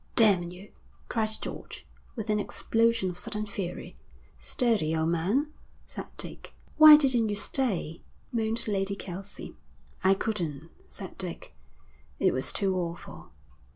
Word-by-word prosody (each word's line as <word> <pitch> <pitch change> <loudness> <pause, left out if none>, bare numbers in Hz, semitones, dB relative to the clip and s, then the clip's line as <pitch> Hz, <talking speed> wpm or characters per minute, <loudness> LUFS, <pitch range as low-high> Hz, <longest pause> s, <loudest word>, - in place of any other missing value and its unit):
'Damn 195 -6 +5
you!' 180 +3 -12 0.4
cried 220 -2 0
George, - - -8 0.3
with 220 -2 -3
an 210 - +2
explosion 230 -2 +1
of 175 - -3
sudden 215 0 -3
fury. 195 -3 -6 0.4
'Steady, 210 -11 0
old 160 0 +1
man,' 205 - 0 0.3
said - - -7
Dick. - - -7 0.2
'Why 310 -1 +11
didn't 255 -6 +2
you 205 - -1
stay?' 200 - 0 0.3
moaned 225 0 +1
Lady 200 -1 -1
Kelsey. 195 0 -8 0.5
'I 190 +1 +5
couldn't,' 165 -8 -3 0.2
said 190 -3 -9
Dick. 180 -3 -6 0.6
'It - - +2
was - - 0
too 195 -3 0
awful.' 170 -1 -6
200 Hz, 130 wpm, -28 LUFS, 180-225 Hz, 0.6 s, Why